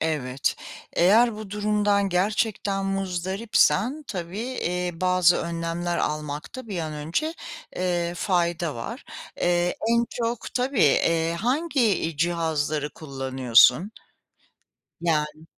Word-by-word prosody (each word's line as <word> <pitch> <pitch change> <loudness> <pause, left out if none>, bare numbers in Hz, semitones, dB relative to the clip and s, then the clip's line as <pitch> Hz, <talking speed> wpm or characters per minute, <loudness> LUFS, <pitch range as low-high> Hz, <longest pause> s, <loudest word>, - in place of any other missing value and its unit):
Evet, 140 -4 -1 0.4
eğer 215 +6 +4
bu 215 -2 -8
durumdan 205 -1 +1
gerçekten 195 +1 0
muzdaripsen 195 - +1
tabii, 180 -1 -5
eee, 180 -7 -2
bazı 180 -1 +4
önlemler 170 +1 -2
almakta 150 - -4
bir 190 -4 -3
an 155 -2 -3
önce, 165 - -2 0.4
eee, 175 -1 -1
fayda 170 -4 0
var. 115 - -7 0.3
Eee, 175 0 +1
en 235 0 +3
çok 235 -1 -3
tabii, 255 -2 0
eee, 165 +3 +3
hangi, 285 +5 0
iii, 190 -8 +1
cihazları 155 -3 0
kullanıyorsun? 135 - +3 1.1
Yani 155 -1 -1
175 Hz, 105 wpm, -25 LUFS, 160-210 Hz, 1.1 s, eğer